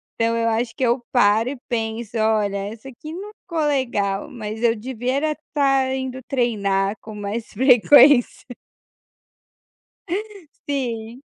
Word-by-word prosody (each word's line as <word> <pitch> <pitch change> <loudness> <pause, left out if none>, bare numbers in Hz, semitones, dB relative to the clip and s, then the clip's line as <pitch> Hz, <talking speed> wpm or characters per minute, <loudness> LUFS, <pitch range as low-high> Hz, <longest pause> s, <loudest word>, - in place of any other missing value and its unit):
Então 230 0 +1
eu 230 0 +1
acho 230 +1 0
que - - -3
eu 240 0 +1
paro 225 -1 +3
e 280 - -5
penso: 225 -1 -3
"Olha, 215 -2 +1
essa 215 +5 -7
aqui 270 +4 -10
não 400 +4 -7
ficou 335 -3 -5
legal 225 -7 -1
mas 220 -2 -6
eu 230 -1 +4
devia 250 +2 -3
era 305 +2 0
estar 270 -3 0
indo 260 -1 -4
treinar 200 -6 0
com 215 - -10
mais 210 +2 -4
frequência". 255 +2 +5 1.6
Uh, - - -1 0.6
sim. 240 -3 -3
235 Hz, 135 wpm, -22 LUFS, 220-265 Hz, 1.6 s, frequência